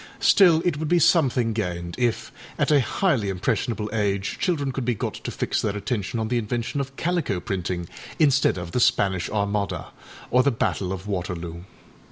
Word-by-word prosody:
Still, 170 -5 +5
it 175 -5 +1
would 155 +1 -3
be 175 - +3
something 130 -8 +3
gained 85 -5 -3
if, 120 -2 0 0.3
at - - +1
a 145 - +6
highly 125 - 0
impressionable 105 +4 -1
age, 100 -2 -1
children 145 -7 0
could 130 0 -3
be 120 -1 0
got - - -3
to - - -6
fix - - -1
their 105 -1 -1
attention 105 +1 -2
on 110 - -1
the 120 +1 +1
invention 115 +4 -2
of 135 0 -7
calico 165 - -1
printing 90 -3 -3 0.3
instead 140 - +3
of 85 -1 -6
the 125 - 0
Spanish 95 -6 +2
Armada 100 -4 -2 0.4
or 125 - +5
the 140 - +3
Battle 100 -6 -1
of 95 0 -5
Waterloo. 90 -3 -4
110 Hz, 180 wpm, -24 LUFS, 95-135 Hz, 0.4 s, a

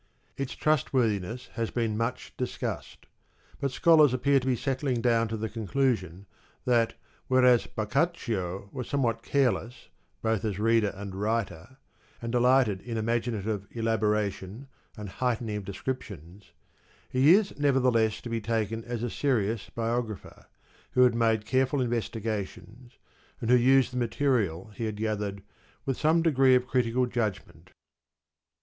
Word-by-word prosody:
Its 135 -2 -4
trustworthiness 125 -7 0
has 115 -2 -2
been 115 -3 -1
much 115 +3 -3
discussed; 125 - -5 0.5
but 140 - 0
scholars 150 0 +5
appear 140 +2 +3
to 130 - -6
be 130 - +2
settling 130 -1 -1
down 115 -1 +2
to 110 +1 -4
the 110 +1 -3
conclusion 110 -5 -1 0.4
that 120 -2 +2 0.3
whereas 125 -2 +4
Boccaccio 110 - -2
was 125 -3 -5
somewhat 120 -5 0
careless 125 -2 -1 0.3
both 110 -3 0
as 105 -4 -2
reader 115 -1 +2
and 100 0 -7
writer,^ 105 +1 -3 0.4
and 115 0 -5
delighted 125 -5 +3
in 115 0 -5
imaginative 110 -3 -2
elaboration 105 0 -1 0.3
and 105 -1 -6
heightening 115 0 -2
of 100 - -6
descriptions, 100 - -7 0.6
he 140 +7 +5
is 205 -1 0
nevertheless 125 -6 +2
to 120 - -7
be 115 -1 -1
taken 115 0 -2
as 120 -1 -4
a - - 0
serious 115 -6 0
biographer, 115 -2 -4 0.5
who 125 - +5
had 125 -2 +5
made 115 -2 +1
careful 130 +3 +1
investigations, 115 -1 -4 0.4
and 115 - -1
who - - +8
used 130 +1 +4
the - - -3
material 115 - 0
he 115 +3 -4
had 110 -1 -3
gathered 105 -2 -3 0.4
with 135 -2 0
some 160 +3 +2
degree 135 -5 +5
of 125 0 +2
critical 125 -1 +1
judgment. 110 -6 -4
115 Hz, 135 wpm, -28 LUFS, 105-130 Hz, 0.6 s, who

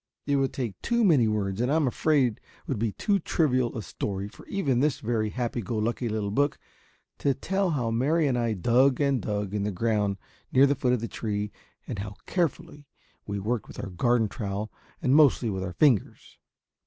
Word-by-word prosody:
It 145 0 +2
would 135 -1 +1
take 115 -8 -4
too 235 0 +1
many 150 - +5
words 105 -1 -1
and 125 +3 +1
I - - +3
am 160 -2 +3
afraid 130 -3 +1 0.2
would 130 -7 -2
be 110 -1 0
too 200 - 0
trivial 130 -9 +1
a 110 - -4
story 100 0 -4
for - - -15
even 140 -11 0
this 150 +1 +1
very 110 -1 -1
happy 120 +1 -2
go 110 +3 -3
lucky 115 +2 -1
little 105 -2 -2
book 145 +6 +1 0.6
to 140 -2 +1
tell 195 +5 0
how 125 -8 -1
Mary 150 +8 +2
and 135 -3 +1
I 120 -2 0
dug 125 +7 +3
and 140 -4 +2
dug 105 -2 -3
in 105 - -1
the 100 - 0
ground 105 0 0 0.3
near 130 +2 +6
the 140 - +3
foot 125 -3 +1
of 125 - 0
the 115 - -3
tree, 105 -2 -3 0.3
and 105 - -5
how 100 0 -5
carefully 150 -4 -2 0.4
we 100 - -3
worked 110 +3 -2
with - - -12
our 95 - -5
garden 115 +5 +2
trowel 100 0 -4 0.3
and 130 +2 +4
mostly 140 -6 +5
with 95 -1 -3
our 90 -2 -4
fingers! 130 - +1
120 Hz, 205 wpm, -27 LUFS, 105-140 Hz, 0.6 s, near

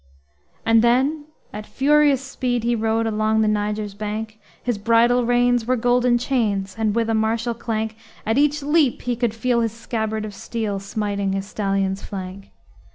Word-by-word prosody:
And 225 0 +5
then 265 +6 +2 0.3
at 210 +1 -7
furious 285 +3 +3
speed 250 -3 -2
he 235 0 +1
rode 225 0 0
Along 220 0 +1
the 215 - +2
Niger's 210 0 -1
bank; 215 +1 -5 0.2
His 240 -4 -1
bridle 235 +3 +3
reins 245 -1 +2
were 255 - +3
golden 245 0 +2
chains, 210 -6 -1
And, 220 -1 0
with 230 -1 +1
a 225 - 0
martial 225 +2 0
clank, 220 -1 -3 0.3
At 225 +5 +1
each 295 0 +2
leap 295 -3 +2
he 245 -1 -1
could 235 -2 -1
feel 235 +1 +1
his 225 -2 -1
scabbard 220 -2 -3
of 210 - -7
steel 210 -1 -3
Smiting 200 -1 -2
his 195 0 -2
stallion's 195 -1 -1
flank. 190 0 -7
225 Hz, 165 wpm, -22 LUFS, 210-245 Hz, 0.3 s, And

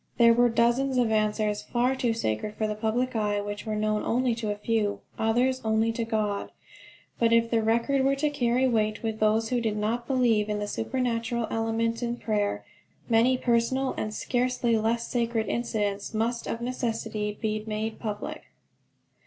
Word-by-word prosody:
There 235 -1 +7
were 240 +1 +4
dozens 240 +3 +2
of 240 -3 +2
answers 215 -1 +1
far 250 +2 0
too 245 -3 0
sacred 210 - -2
for 220 - -1
the 215 - -1
public 230 +4 -1
eye, 210 -2 +1
which 205 +2 -5
were 215 - -1
known 215 0 0
only 245 +1 +1
to 225 -2 -3
a 205 - -1
few, 210 -1 -1 0.2
others 245 +4 +1
known 220 0 0
only 220 +1 +2
to 230 +1 -2
God. 215 -3 -2 0.7
But 230 -1 +3
if 230 0 +3
the 230 -1 +3
record 235 +5 +2
were 275 +1 +3
to 295 +2 0
carry 255 -2 +2
weight 215 -3 0
with 220 -1 -2
those 220 +1 +2
who 245 -1 0
did 220 -2 -1
not 230 +3 -1
believe 235 -6 +2
in 210 - 0
the 205 0 -3
supernatural 230 0 -1
element 225 +1 0
in 240 0 -1
prayer, 210 -3 -1 0.4
many 235 +3 +4
personal 250 +2 +1
and 215 - -3
scarcely 245 +1 0
less 230 +2 0
sacred 230 -2 0
incidents 210 -3 -2
must 230 +2 -1
of 230 - -3
necessity 225 -4 -3
be 215 -1 -2
made 220 +1 -3
public. 210 -2 -5
225 Hz, 180 wpm, -27 LUFS, 215-240 Hz, 0.7 s, There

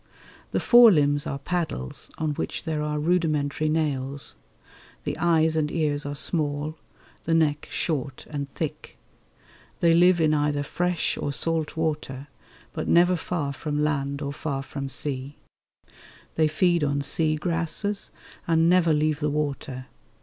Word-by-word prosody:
The - - +1
fore 240 -2 +8
limbs 145 -3 +2
are 140 - -3
paddles, 155 - -4
on 155 -1 -1
which 145 - -4
there 155 -2 -2
are 150 0 -2
rudimentary 155 -2 +1
nails; 140 -3 -1 0.7
the - - -2
eyes 160 -1 +3
and 155 -1 0
ears 145 -3 0
are 145 - -4
small; 150 0 -1 0.5
the 165 - +2
neck 150 -2 +1
short 140 -5 -3
and 140 -2 -4
thick. 155 -3 -5 0.8
They 170 -1 +4
live 175 +1 +5
in 155 -1 +3
either 145 -1 +1
fresh 175 +3 -1
or 145 - -2
salt 160 +1 -1
water, 150 -3 -3 0.4
but - - -4
never 175 +2 +5
far 160 -4 -3
from 150 +1 -2
land 140 -1 -1
or 140 0 -3
far 140 -2 -3
from 135 0 -5
sea. 135 +1 -3 1.0
They 160 -1 +3
feed 170 +1 +2
on 140 -1 0
sea 155 +2 +2
grasses 170 +5 -2 0.4
and 165 0 +3
never 175 -2 +4
leave 155 0 +1
the 150 -1 0
water. 140 -3 -3
150 Hz, 145 wpm, -25 LUFS, 145-165 Hz, 1.0 s, fore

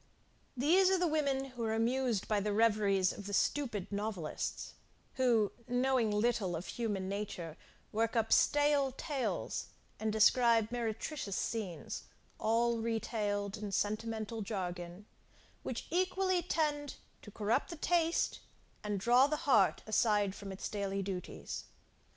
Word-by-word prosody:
These 350 +9 +5
are 380 - +3
the 360 - +1
women 280 -4 0
who 240 -2 -5
are 220 0 0
amused 235 -2 0
by 210 -1 +2
the 205 +1 -1
reveries 205 -4 +3
of 200 - -8
the 205 - -5
stupid 225 -10 0
novelists, 200 -6 -3 0.4
who, 235 -5 +3 0.2
knowing 250 -2 +2
little 210 -4 +1
of 165 +3 -5
human 205 -5 -2
nature, 190 -5 -4 0.4
work 225 +2 0
up 225 -1 +3
stale 290 -2 +3
tales, 275 -1 -3 0.3
and 220 0 0
describe 225 +1 +4
meretricious 230 -1 -3
scenes, 205 -7 -3 0.3
all 230 +1 +2
retailed 210 -3 -2
in 210 - -5
a - - -6
sentimental 220 +2 -2
jargon, 180 -2 -5 0.6
which - - -4
equally 370 0 +1
tend 295 -4 -1 0.3
to - - -11
corrupt 215 +5 0
the 340 - -5
taste, 335 +1 +1 0.4
and 205 -1 -2
draw 245 +6 +5
the 305 +2 -3
heart 275 - +4
aside 210 -2 +2
from 200 -1 -8
its 190 - -5
daily 200 -2 -2
duties. 185 -2 -5
225 Hz, 135 wpm, -33 LUFS, 205-265 Hz, 0.6 s, These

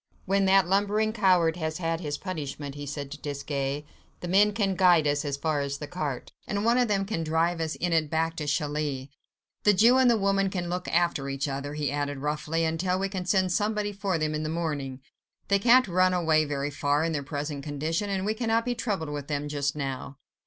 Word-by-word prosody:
"When 195 +1 +2
that 190 -1 +5
lumbering 205 +3 +1
coward 180 -6 +3
has 160 -2 -3
had 165 -2 -1
his 145 -4 -3
punishment," 145 -6 -5
he 145 0 -7
said 140 -1 -5
to 150 - -7
Desgas, 140 0 -3 0.4
"the 175 - -4
men 200 +4 +4
can 200 -2 0
guide 175 -4 +5
us 145 +1 +1
as 140 -2 -2
far 155 0 0
as 140 0 -3
the 150 - -6
cart, 145 -5 -4 0.2
and 205 +1 -1
one 235 +2 +4
of 245 - +3
them 195 -2 +1
can 180 -5 -2
drive 165 +2 +1
us 160 -1 -2
in 175 -1 -1
it 155 -2 +2
back 160 +1 0
to 150 - -3
Calais. 145 -2 -2 0.5
The 210 -1 +4
Jew 235 +6 +6
and 255 -1 +5
the 235 - +4
woman 195 -1 +2
can 175 -2 -3
look 180 +1 -3
after 170 -5 +1
each 135 +2 -2
other," 140 +1 -4
he 145 -3 -1
added 145 0 -2
roughly, 150 +3 -1
"until 175 +3 0
we 195 +1 -1
can 190 -2 -4
send 185 -1 +2
somebody 210 +2 0
for 195 -3 -1
them 155 -1 -1
in 155 - -2
the 155 - -3
morning. 145 -5 -3 0.5
They 200 0 +4
can't 245 +3 +5
run 185 0 +3
away 160 -3 +3
very 145 0 -2
far, 145 +2 +1
in 165 - 0
their 150 -3 -1
present 145 0 -4
condition, 155 +7 -2
and 190 -1 -1
we 215 - +1
cannot 225 0 0
be 245 - 0
troubled 200 -10 -3
with 145 -1 -5
them 145 -1 -2
just 145 -1 -1
now." 135 -1 -4
160 Hz, 225 wpm, -27 LUFS, 145-195 Hz, 0.5 s, Jew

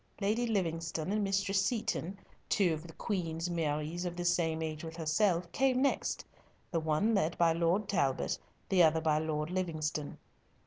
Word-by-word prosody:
Lady 215 +4 +1
Livingstone 165 -4 -1
and 210 0 +1
Mistress 195 0 +1
Seaton, 195 -4 -1 0.3
two 185 -6 +3
of 155 +2 -6
the 165 - -11
Queen's 170 -4 -2
Maries 160 +1 -1
of 175 -1 -3
the 175 0 -4
same 165 -2 +1
age 155 0 -4
with 165 0 -6
herself, 170 +2 +1
came 260 -1 +2
next, 275 +1 0 0.5
the 165 - +1
one 160 +8 +1
led 175 -5 +1
by 165 -1 +4
Lord 170 +5 +1
Talbot, 140 -10 0 0.3
the 190 -2 +4
other 160 -1 +5
by 155 -1 +2
Lord 155 0 -2
Livingstone. 155 -5 -2
170 Hz, 165 wpm, -32 LUFS, 160-195 Hz, 0.5 s, other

